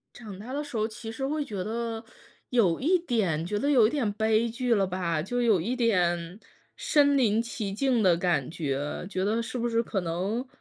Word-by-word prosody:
长 210 -5 -9
大 230 +6 -8
的 290 +2 -2
时 285 -5 -7
候 215 0 +1
其 225 0 -8
实 270 +4 -3
会 300 +1 -1
觉 200 -7 -4
得， 225 +2 -4 0.5
有 205 -9 +2
一 355 +7 +3
点 210 - 0
觉 205 +4 -2
得 285 +6 0
有 245 -6 +6
一 - - 0
点 275 -8 0
悲 220 +1 +2
剧 235 +1 0
了 195 -3 +2
吧， 175 -3 -1
就 245 +8 -2
有 220 -7 +4
一 235 +10 -2
点 180 -6 +1 0.4
身 290 - +3
临 225 -5 +3
其 225 -4 -4
境 245 +1 +1
的 180 -3 +4
感 170 -7 0
觉， 145 0 -3
觉 190 -1 -2
得 225 +3 +1
是 240 +2 -5
不 240 0 0
是 230 0 +1
可 210 -4 -2
能 185 +9 -2
220 Hz, 225 characters per minute, -27 LUFS, 185-245 Hz, 0.5 s, 有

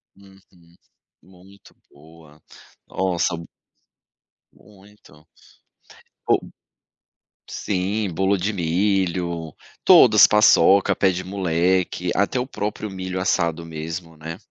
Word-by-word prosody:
Uhum. 95 -1 -19 0.9
Muito 95 +2 -20 0.2
boa. 75 0 -19 0.5
Nossa, 90 -3 -1
m 85 - -9 1.1
muito. 100 -6 -21 1.0
Ou - - +3 1.1
Sim, 100 +1 -3
bolo 95 +3 +1
de 100 +4 -2
milho 85 -2 -1 0.3
todas, - - +7
paçoca, 100 -2 +4
pé 95 -1 +2
de 90 +1 -4
moleque, 90 -1 -1
até 100 +5 0
o 125 - -3
próprio 105 -2 -5
milho 95 -1 -5
assado 85 -3 -1
mesmo, 80 +1 -7
né. 80 +2 -8
90 Hz, 95 wpm, -21 LUFS, 85-100 Hz, 1.1 s, todas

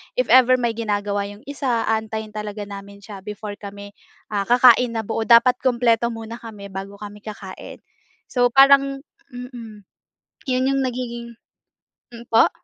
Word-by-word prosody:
if - - 0
ever 255 0 +7
may 240 -2 0
ginagawa 205 -2 -1
'yong 205 +3 -12
isa, 265 -5 -1
aantayin 220 -1 -2
talaga 210 0 -5
namin 200 0 -10
siya 200 -1 -9
before 210 0 -7
kami, 200 0 -9 0.4
ah, 200 -1 0
kakain 245 0 +6
na 220 - -1
buo. 225 +1 -2
Dapat 245 +2 +6
kumpleto 235 -2 +2
muna 225 +1 -8
kami 210 -3 -10
bago 195 +1 -7
kami 210 0 -9
kakain. 205 -3 -9 0.5
So 245 -1 +3
parang 275 0 +5 0.3
mm. 235 -4 -9 0.6
'Yon 255 0 +1
'yong 275 0 +1
nagiging 235 -1 -5 0.8
hmm, 235 0 -11
po? 225 - +5
225 Hz, 145 wpm, -22 LUFS, 205-250 Hz, 0.8 s, ever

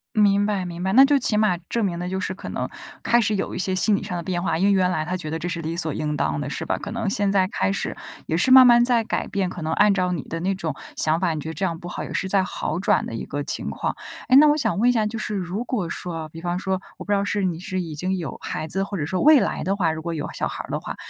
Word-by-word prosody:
明 205 -1 +4
白 200 -3 -1
明 175 -1 -6
白， 190 +1 0
那 265 +4 +8
就 285 0 +3
起 225 -4 +1
码 210 -4 +2
证 230 -3 0
明 170 -3 -2
了， 180 0 -3
就 190 +1 -2
是 190 - -2
可 185 - -8
能 - - -3 0.4
开 240 0 +4
始 215 -1 +1
有 195 - -3
一 - - -4
些 185 0 +1
心 205 +3 +3
理 - - -2
上 180 - -4
的 170 - -4
变 175 0 -2
化， 175 -3 0
因 185 - +1
为 200 - +4
原 185 -2 +3
来 155 -4 -1
她 180 - -2
觉 170 -4 -4
得 160 - -2
这 165 +2 -4
是 170 -1 -3
理 165 +1 -4
所 160 -3 0
应 150 0 -2
当 75 - -1
的， - - -4
是 - - -4
吧？ - - -1
可 205 - -7
能 225 -1 -3
现 200 0 +1
在 190 -2 +3
开 95 - -1
始， - - -2 0.3
也 160 - -1
是 180 +10 +2
慢 260 0 +10
慢 240 -1 +7
在 240 -2 +2
改 - - -2
变， 195 -2 -1
可 180 - -7
能 160 0 -2
按 205 +2 +4
照 185 -2 0
你 170 -6 -3
的 165 - -5
那 190 +3 -1
种 165 -5 -3 0.2
想 155 +1 +2
法， 170 -3 0
你 - - -4
觉 155 - -6
得 - - -5
这 195 - -5
样 170 -3 -1
不 175 - -8
好 - - -5
也 - - -7
是 190 - -1
在 190 0 +2
好 180 -2 -3
转 195 - +2
的 - - -6
一 115 - -4
个 145 0 -4
情 - - -2
况。 - - -3 0.3
诶， 255 - +6
那 300 +2 +8
我 295 0 +4
想 195 - 0
问 240 +3 +4
一 - - +6
下， 220 -3 +1
就 220 +2 -3
是 215 0 -3
如 190 +3 -3
果 210 -10 -2
说 - - -5
哦， 160 -1 -6
比 165 - -8
方 175 0 -2
说， 190 0 -2 0.2
我 - - -9
不 205 - -4
知 - - +4
道 200 - +1
是 200 0 -1
你 175 -3 -1
是 185 +1 -3
已 165 -3 -4
经 185 +5 -2
有 170 - -5
孩 155 - -4
子， 195 +5 0
或 200 0 -5
者 150 - -2
说 185 +4 -2
未 305 -1 +7
来 - - -1
的 195 - 0
话， 180 -5 +1
如 160 0 -5
果 170 +1 -4
有 150 - -3
小 - - -1
孩 - - -6
儿 - - -12
的 - - -1
话， - - -6
185 Hz, 355 characters per minute, -23 LUFS, 165-205 Hz, 0.4 s, 慢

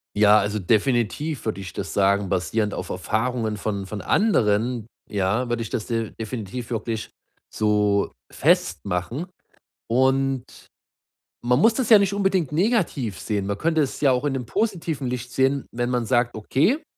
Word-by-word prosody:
Ja, 105 0 +6
also 105 +1 -1
definitiv 120 - 0
würde 105 -3 -2
ich 95 - -7
das - - -5
sagen, 100 0 +2
basierend 105 +4 0
auf - - -5
Erfahrungen 110 -1 -1
von 100 -2 -3
von 100 +1 -6
anderen, 120 - +1 0.2
ja, 100 +5 0
würde 120 -1 -1
ich 115 - -4
das 105 - -3
de 115 -2 -2
definitiv 115 +1 -5
wirklich 115 -1 -3 0.4
so 105 -1 +2 0.2
festmachen, 100 - 0 0.6
und 130 +1 +2 1.0
man 125 +2 +3
muss 225 +7 +5
das 250 -1 -1
ja 220 - +10
nicht 200 -1 +1
unbedingt 195 -6 +1
negativ 155 - 0
sehen. 100 0 -2
Man 100 0 -2
könnte 160 -1 +1
es 135 - -2
ja 140 -3 +5
auch 125 +1 +1
in 145 -2 0
'nem 130 -2 -3
positiven 165 - -2
Licht 125 0 -4
sehen, 135 +1 +1
wenn 120 +1 -2
man 125 -2 0
sagt: 120 0 +1
„Okay, 160 - +1
120 Hz, 160 wpm, -23 LUFS, 105-140 Hz, 1.0 s, ja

